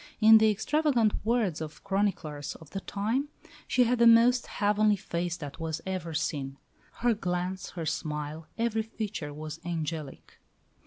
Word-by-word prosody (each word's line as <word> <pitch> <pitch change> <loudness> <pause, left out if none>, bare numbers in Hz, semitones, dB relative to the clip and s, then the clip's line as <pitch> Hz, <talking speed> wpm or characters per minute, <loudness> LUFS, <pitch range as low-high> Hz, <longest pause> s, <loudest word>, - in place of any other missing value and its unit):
In 220 0 +8
the 220 0 +5
extravagant 235 +1 +2
words 215 -8 +1
of 155 -1 -7
chroniclers 190 -8 -1
of 160 -3 -14
the 195 - -3
time, 220 +9 -1 0.4
"she 250 - +4
had 245 0 +1
the 235 - +7
most 235 +2 +6
heavenly 210 0 +2
face 175 -2 -3
that 145 +1 -8
was 160 -1 -3
ever 180 -4 -4
seen. 140 -3 -2 0.5
Her 240 - +5
glance, 180 -2 -3
her 165 - -3
smile, 150 +1 -3
every 230 -1 +1
feature 215 -8 -5
was 155 +2 -7
angelic." 160 -3 -5
190 Hz, 150 wpm, -29 LUFS, 160-220 Hz, 0.5 s, In